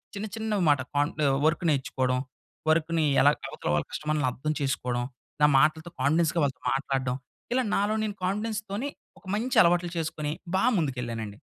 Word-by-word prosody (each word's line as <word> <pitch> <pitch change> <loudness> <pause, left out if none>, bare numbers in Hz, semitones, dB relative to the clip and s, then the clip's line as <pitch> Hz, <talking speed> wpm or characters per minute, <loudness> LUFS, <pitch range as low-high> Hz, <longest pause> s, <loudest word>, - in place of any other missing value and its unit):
చిన్న 200 +1 -3
చిన్న 220 -2 -1
మాట, 145 -2 +4 0.2
కంఫ 145 +3 +1 0.3
వర్క్ 160 +2 +2
నేర్చుకోవడం. 130 -3 0 0.5
వర్క్‌ని 160 0 +2 0.2
ఎలా 145 - +7 0.2
అవతల - - -5
వాళ్ళ 75 - 0
కస్టమర్లని 150 -3 -1
అర్థం 150 +5 -3
చేసుకోడం. 125 -3 -1 0.4
నా 150 - +8
మాటలతో 155 +3 +2
కాన్ఫిడెన్స్‌గా 165 +3 +2
వాళ్ళతో 135 -3 -1
మాట్లాడడం. 135 -2 -1 0.4
ఇలా 260 +1 +2
నాలో 205 +2 +1
నేను 210 -2 -3
కాన్ఫిడెన్స్ 210 +3 -1
తోని, 220 +9 -2 0.3
ఒక - - -26
మంచి 240 +4 -1
అలవాట్లు 175 0 +2
చేసుకొని, 155 -2 -2 0.2
బా 190 - +2
ముందుకెళ్ళానండి. 120 - -3
155 Hz, 150 wpm, -27 LUFS, 135-190 Hz, 0.5 s, నా